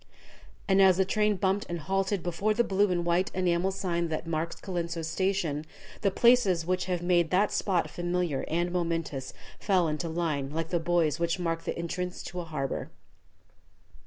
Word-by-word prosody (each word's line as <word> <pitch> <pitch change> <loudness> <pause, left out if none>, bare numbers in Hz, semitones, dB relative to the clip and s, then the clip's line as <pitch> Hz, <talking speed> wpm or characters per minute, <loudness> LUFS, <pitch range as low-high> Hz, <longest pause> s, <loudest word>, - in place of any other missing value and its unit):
And 195 0 +4
as 190 -2 +6
the 190 - +3
train 210 +2 +2
bumped 190 +2 0
and 170 - -2
halted 195 +3 -1
before 195 +5 0
the 235 - +3
blue 200 -1 +2
and 175 -1 0
white 175 +4 +2
enamel 180 0 +1
sign 175 -3 -1
that 160 +1 -3
marks 165 0 -2
Colenso 170 -3 -4
station, 165 -3 -1 0.4
the 200 - +3
places 195 -6 +4
which 185 +1 0
have 180 -2 -2
made 175 -2 +3
that 195 +4 +2
spot 185 -4 +1
familiar 175 -4 -1
and 175 +2 0
momentous 165 -6 -2 0.3
fell 185 -5 +2
into 155 +2 -2
line 160 -5 -1
like 165 +2 -3
the 175 - +1
buoys 165 -2 +1
which 170 +1 0
mark 165 -2 -2
the - - -3
entrance 180 +2 -4
to 180 - -6
a 175 - -4
harbor. 145 -4 -3
175 Hz, 175 wpm, -28 LUFS, 165-190 Hz, 0.4 s, as